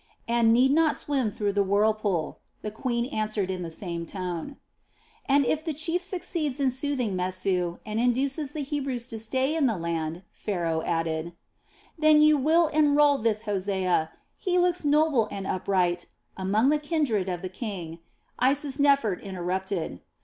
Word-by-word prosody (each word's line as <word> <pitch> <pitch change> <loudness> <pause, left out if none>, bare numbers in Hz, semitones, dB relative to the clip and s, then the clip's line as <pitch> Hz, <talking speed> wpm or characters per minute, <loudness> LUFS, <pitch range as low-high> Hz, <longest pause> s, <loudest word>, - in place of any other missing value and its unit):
"And 235 -1 +3
need 255 +3 +5
not 315 +1 +3
swim 270 -6 0
through 205 -1 -2
the 200 - +2
whirlpool," 205 -3 +1 0.2
the 210 - -3
queen 235 +1 -1
answered 215 -6 -2
in 185 -1 -4
the 170 - -4
same 170 0 -4
tone. 180 - -5 0.7
"And 280 0 +4
if 310 +5 0
the 320 -3 -3
chief 330 +4 -1
succeeds 335 -6 -3
in 270 -2 +2
soothing 260 -6 -2
Mesu, 180 -1 -1
and 215 +1 -2
induces 270 +4 0
the 305 - -3
Hebrews 270 -4 -3
to 225 -3 -7
stay 260 +7 0
in 305 -4 +3
the 225 -5 0
land," 165 0 -3
Pharaoh 170 -5 -2
added: 165 0 -2 0.7
"Then 310 -1 +6
you 305 0 +6
will 315 +5 +4
enrol 295 -2 +4
this 215 -1 0
Hosea 190 -5 0 0.3
he 360 -1 0
looks 355 -1 +2
noble 295 -6 +3
and 195 -1 -5
upright 180 -2 0 0.3
among 205 +7 +2
the 300 0 +3
kindred 290 - 0
of 180 -1 -4
the - - -2
king," 185 -5 -6 0.4
Isisnefert 275 -5 +2
interrupted. 185 - -3
225 Hz, 155 wpm, -26 LUFS, 185-285 Hz, 0.7 s, Then